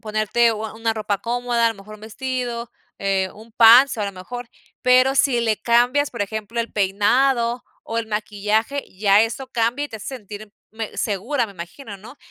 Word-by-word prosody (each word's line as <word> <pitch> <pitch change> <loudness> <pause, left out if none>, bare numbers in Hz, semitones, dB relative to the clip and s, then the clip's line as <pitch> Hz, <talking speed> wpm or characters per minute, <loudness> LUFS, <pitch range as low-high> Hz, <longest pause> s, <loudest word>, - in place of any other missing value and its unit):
ponerte 215 +2 +1
u 220 0 -5
a 220 - -10
una 225 0 -1
ropa 210 -2 -2
cómoda, 240 0 0
a - - +5
lo 225 - -4
mejor 205 +2 -12
un 215 - -15
vestido, 240 +1 -4 0.3
eh, 195 -1 0
un 220 +2 -15
pants, 240 +3 +7
a 210 - 0
lo 200 - -4
mejor, 235 +6 -8 0.3
pero 255 +1 +4
si 270 -3 +3
le 220 -2 +1
cambias, 245 +6 +2
por 235 -4 -3
ejemplo, 220 +3 -5
el 230 - -5
peinado 235 +5 +1 0.2
o 230 +1 -3
el 225 - -3
maquillaje, 215 +5 -1
ya 200 +1 +5
eso 240 +4 -3
cambia, 240 +4 0
y - - -6
te 220 - -7
hace 210 - -10
sentir 210 -2 -10 0.2
me 220 -1 -6
segura, 230 +6 -1
me 200 - -12
imagino, 195 +5 -9
¿no? 240 +8 -13
225 Hz, 195 wpm, -21 LUFS, 210-245 Hz, 0.3 s, pants